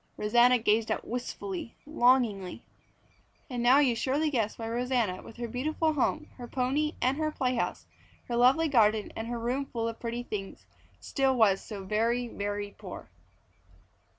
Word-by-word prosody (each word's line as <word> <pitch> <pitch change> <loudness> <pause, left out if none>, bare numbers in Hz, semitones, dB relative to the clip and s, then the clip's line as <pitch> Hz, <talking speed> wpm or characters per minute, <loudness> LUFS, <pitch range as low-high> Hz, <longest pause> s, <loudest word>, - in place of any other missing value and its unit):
Rosanna 240 +4 +5
gazed 220 -1 +1
out - - -2
wistfully, 300 +5 -5
longingly. 240 - +2 0.9
And 245 -1 -2
now 245 +3 +6
you 270 -5 +4
surely 285 +6 0
guess 225 -5 -1
why 225 - -5
Rosanna, 235 -5 0
with 225 - -13
her 240 0 -4
beautiful 310 +6 0
home, 305 +2 0
her 245 -2 -7
pony 275 +5 0
and 260 +2 +2
her 310 0 0
playhouse, 255 -4 -1 0.4
her 240 - -2
lovely 260 +7 +4
garden, 220 -6 +3
and 225 - -4
her 240 0 -3
room 250 +4 -2
full 230 -3 -3
of 230 0 -5
pretty 235 +1 -4
things, 200 -4 -6 0.3
still 270 -2 +1
was 205 -5 +4
so 205 -3 -7
very, 230 +5 0
very 205 -1 -4
poor. - - -10
240 Hz, 155 wpm, -29 LUFS, 225-265 Hz, 0.9 s, now